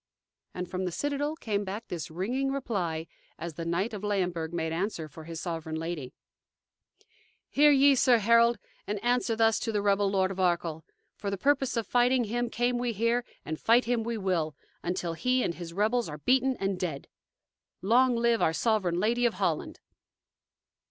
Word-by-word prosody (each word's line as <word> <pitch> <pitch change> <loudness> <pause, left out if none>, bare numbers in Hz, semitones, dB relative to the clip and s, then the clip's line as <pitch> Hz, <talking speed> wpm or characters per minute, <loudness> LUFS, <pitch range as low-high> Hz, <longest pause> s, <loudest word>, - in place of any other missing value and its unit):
And 180 0 -4
from 185 +1 -3
the 180 - -2
citadel 290 - -2
came 205 -8 -2
back 200 +3 -6
this 170 -3 -5
ringing 245 +12 -1
reply, 185 -12 -2 0.3
as 170 0 -6
the 165 +2 -6
knight 185 +7 -1
of 205 -1 -6
Leyenburg 180 -6 -1
made 160 -2 -2
answer 170 -2 -2
for 155 +1 -12
his 165 -1 -6
sovereign 165 -3 -4
lady: 160 -5 -4 1.4
"Hear 295 +1 +5
ye, 280 0 +6
sir 250 -2 +5
Herald, 230 +2 +4 0.3
and 210 +1 -2
answer 245 -1 +1
thus 225 -1 +3
to 225 - -2
the 210 - 0
rebel 200 0 +3
Lord 190 -1 +1
of 190 - -6
Arkell: 170 -3 0 0.3
'For 200 - -3
the 200 - -2
purpose 270 +1 +1
of 230 - 0
fighting 245 +3 +3
him 240 +2 -2
came 240 +1 0
we 240 -1 -1
here, 230 +3 +1 0.2
and 155 0 -4
fight 235 +2 +4
him 240 -1 +1
we 230 0 -3
will, 175 -6 -1 0.3
until 175 -1 -2
he 250 +9 +1
and 170 - -1
his 170 -1 -8
rebels 215 +3 +1
are 150 - -6
beaten 255 - +2
and 195 -1 -1
dead.' 160 -7 -4 0.8
Long 245 +5 +4
live 235 -1 +2
our 160 - +3
Sovereign 190 -4 +1
Lady 240 +4 +2
of 230 - -3
Holland!" - - -2
205 Hz, 180 wpm, -28 LUFS, 175-240 Hz, 1.4 s, ye